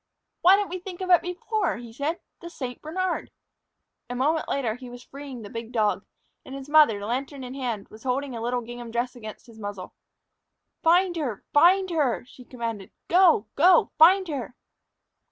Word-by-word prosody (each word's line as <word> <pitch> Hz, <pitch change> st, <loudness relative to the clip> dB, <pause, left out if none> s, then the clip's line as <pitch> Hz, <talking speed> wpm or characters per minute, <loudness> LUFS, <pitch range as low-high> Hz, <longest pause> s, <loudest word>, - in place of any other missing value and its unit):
"Why 370 Hz, +3 st, +7 dB
didn't 405 Hz, -2 st, -1 dB
we 365 Hz, -, -4 dB
think 360 Hz, -1 st, -9 dB
of 370 Hz, -1 st, -1 dB
it 350 Hz, -, +7 dB
before?" 360 Hz, 0 st, -2 dB
he 235 Hz, -1 st, -10 dB
said 290 Hz, +7 st, -2 dB, 0.2 s
"the 340 Hz, -, -9 dB
St. 255 Hz, -7 st, -7 dB
Bernard!" 360 Hz, +3 st, -2 dB, 0.8 s
A 245 Hz, -, -4 dB
moment 305 Hz, +5 st, 0 dB
later 250 Hz, -6 st, 0 dB
he 250 Hz, +2 st, -10 dB
was 245 Hz, 0 st, -11 dB
freeing 275 Hz, -4 st, -9 dB
the 205 Hz, -, -9 dB
big 230 Hz, 0 st, -6 dB
dog, 210 Hz, -4 st, +1 dB, 0.4 s
and 265 Hz, -, -9 dB
his 275 Hz, 0 st, -8 dB
mother, 290 Hz, -10 st, +5 dB
lantern 265 Hz, +4 st, -3 dB
in 250 Hz, 0 st, -7 dB
hand, 240 Hz, -7 st, -4 dB
was 215 Hz, -, -14 dB
holding 265 Hz, 0 st, -2 dB
a 230 Hz, -, -5 dB
little 245 Hz, +1 st, -1 dB
gingham 240 Hz, 0 st, -8 dB
dress 240 Hz, +2 st, -2 dB
against 220 Hz, -3 st, -10 dB
his 230 Hz, -2 st, -15 dB
muzzle. 205 Hz, -3 st, -7 dB, 0.9 s
"Find 350 Hz, +2 st, +4 dB
her! 250 Hz, -10 st, -3 dB
Find 365 Hz, +5 st, +5 dB
her!" 285 Hz, -8 st, 0 dB
she 250 Hz, 0 st, -15 dB
commanded. 230 Hz, -5 st, -5 dB, 0.2 s
"Go, 345 Hz, -, +5 dB
go! 350 Hz, +3 st, +5 dB
Find 370 Hz, +4 st, +7 dB
her!" 270 Hz, -6 st, -5 dB
265 Hz, 180 wpm, -25 LUFS, 235-335 Hz, 0.9 s, Why